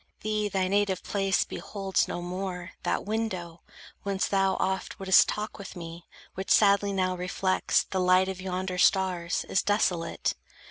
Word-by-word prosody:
Thee 215 Hz, -1 st, -1 dB
thy 190 Hz, -2 st, 0 dB
native 200 Hz, -1 st, +1 dB
place 195 Hz, -1 st, +1 dB
Beholds 195 Hz, -2 st, -2 dB
no 175 Hz, -, -4 dB
more; 180 Hz, 0 st, -5 dB
that -, -, -1 dB
window, 190 Hz, -6 st, -3 dB, 0.4 s
whence 195 Hz, -1 st, -1 dB
thou 195 Hz, -1 st, +2 dB
oft 190 Hz, 0 st, -2 dB
Wouldst 190 Hz, -1 st, +5 dB
talk 215 Hz, +1 st, -4 dB
with 200 Hz, -, -8 dB
me, 170 Hz, 0 st, -9 dB, 0.3 s
which 190 Hz, +1 st, -6 dB
sadly 200 Hz, -1 st, +4 dB
now 185 Hz, -1 st, 0 dB
reflects 180 Hz, +1 st, +1 dB
The 190 Hz, -, -3 dB
light 185 Hz, +1 st, +4 dB
of 190 Hz, -1 st, -5 dB
yonder 185 Hz, 0 st, -3 dB
stars, 180 Hz, -2 st, +2 dB
is 190 Hz, -, +2 dB
desolate. 185 Hz, -5 st, 0 dB
190 Hz, 150 wpm, -28 LUFS, 180-200 Hz, 0.4 s, Wouldst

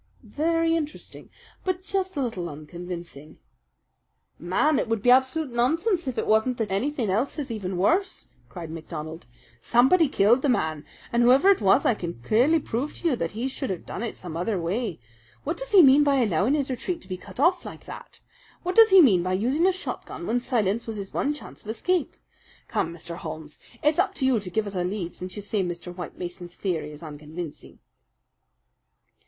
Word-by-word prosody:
"Very 330 Hz, +2 st, +1 dB
interesting, 305 Hz, -2 st, -6 dB, 0.3 s
but 370 Hz, -1 st, -2 dB
just 380 Hz, -3 st, -2 dB
a 275 Hz, -, +1 dB
little 185 Hz, -8 st, -3 dB
unconvincing." 165 Hz, 0 st, -8 dB, 1.0 s
"Man, 230 Hz, -, +2 dB
it -, -, -1 dB
would 225 Hz, -2 st, -1 dB
be 245 Hz, -, +6 dB
absolute 265 Hz, +3 st, +3 dB
nonsense 325 Hz, -, +1 dB
if 255 Hz, -, -3 dB
it -, -, 0 dB
wasn't 220 Hz, +3 st, +2 dB
that 220 Hz, -4 st, -2 dB
anything 230 Hz, +1 st, 0 dB
else 240 Hz, +10 st, 0 dB
is 280 Hz, -4 st, -4 dB
even 190 Hz, -5 st, -4 dB
worse!" 345 Hz, -, +1 dB, 0.2 s
cried 170 Hz, -3 st, -8 dB
MacDonald. 160 Hz, -2 st, -7 dB, 0.3 s
"Somebody 265 Hz, -, +4 dB
killed 230 Hz, +3 st, +4 dB
the 285 Hz, -, +1 dB
man, 155 Hz, -, 0 dB, 0.3 s
and 235 Hz, -, +3 dB
whoever 265 Hz, +11 st, +6 dB
it 390 Hz, -, +2 dB
was 200 Hz, +7 st, +4 dB
I -, -, +4 dB
could 170 Hz, -, -6 dB
clearly 250 Hz, -, +4 dB
prove 275 Hz, +1 st, -3 dB
to 340 Hz, -, 0 dB
you 270 Hz, -, +1 dB
that 165 Hz, -3 st, -3 dB
he 230 Hz, +5 st, -2 dB
should 270 Hz, 0 st, -4 dB
have 185 Hz, -3 st, -4 dB
done -, -, -6 dB
it 235 Hz, -, -4 dB
some 175 Hz, -3 st, -7 dB
other 180 Hz, +3 st, -1 dB
way. 185 Hz, +3 st, -2 dB, 0.4 s
What 320 Hz, +4 st, -2 dB
does -, -, -6 dB
he 390 Hz, -4 st, +8 dB
mean 275 Hz, +1 st, +7 dB
by 285 Hz, -1 st, +3 dB
allowing 225 Hz, -, +2 dB
his 275 Hz, -3 st, -1 dB
retreat 335 Hz, +7 st, -3 dB
to -, -, -14 dB
be 185 Hz, -, -4 dB
cut 185 Hz, -, -12 dB
off 350 Hz, +5 st, +3 dB
like -, -, -10 dB
that? -, -, -11 dB, 0.4 s
What 365 Hz, +1 st, -2 dB
does 450 Hz, -1 st, +8 dB
he 380 Hz, -2 st, +8 dB
mean 195 Hz, -10 st, +5 dB
by 185 Hz, +1 st, -1 dB
using 260 Hz, -, +2 dB
a -, -, +5 dB
shotgun 255 Hz, -, -6 dB
when 235 Hz, +5 st, +1 dB
silence 230 Hz, -3 st, 0 dB
was 225 Hz, -, -4 dB
his 195 Hz, -1 st, -7 dB
one 290 Hz, -, 0 dB
chance 295 Hz, -, -9 dB
of 215 Hz, -, -11 dB
escape? 350 Hz, +8 st, -1 dB, 0.5 s
Come, 165 Hz, -, -1 dB
Mr. 170 Hz, 0 st, -7 dB
Holmes, 155 Hz, -2 st, -8 dB, 0.2 s
it's 300 Hz, +2 st, +3 dB
up 370 Hz, -, +1 dB
to 265 Hz, -, -1 dB
you 260 Hz, -4 st, +3 dB
to 195 Hz, -3 st, -7 dB
give 215 Hz, +4 st, -1 dB
us 200 Hz, -, -5 dB
a 180 Hz, -2 st, -1 dB
lead, 180 Hz, -2 st, -3 dB
since 185 Hz, 0 st, -6 dB
you 205 Hz, -, -5 dB
say 205 Hz, 0 st, -1 dB
Mr. 175 Hz, 0 st, -6 dB
White 175 Hz, -3 st, -7 dB
Mason's 175 Hz, 0 st, -7 dB
theory 170 Hz, -6 st, -2 dB
is 150 Hz, +2 st, -11 dB
unconvincing." 155 Hz, +1 st, -8 dB
225 Hz, 200 wpm, -25 LUFS, 175-290 Hz, 1.0 s, he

